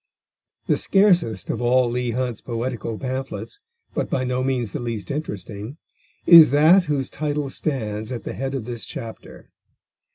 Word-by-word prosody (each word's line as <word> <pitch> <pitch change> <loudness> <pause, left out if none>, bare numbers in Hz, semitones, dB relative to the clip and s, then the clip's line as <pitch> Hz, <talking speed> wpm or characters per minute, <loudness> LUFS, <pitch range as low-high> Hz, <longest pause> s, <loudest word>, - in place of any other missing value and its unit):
The - - +2
scarcest 180 - +2
of - - -4
all 125 +1 +3
Leigh 125 +1 -2
Hunt's 125 -1 -2
poetical 115 -1 -4
pamphlets, 130 - -5 0.3
but - - -2
by 130 - 0
no 125 0 -1
means 125 -5 -1
the - - -4
least 115 0 -4
interesting, 110 - -6 0.5
is 165 -5 +10
that 160 +7 +5
whose 140 -3 -1
title 150 -1 -3
stands 110 -6 -3
at 120 - -5
the - - -5
head 135 +1 -3
of 125 -5 -4
this 120 -1 -6
chapter. 115 -1 -9
130 Hz, 155 wpm, -22 LUFS, 115-145 Hz, 0.5 s, is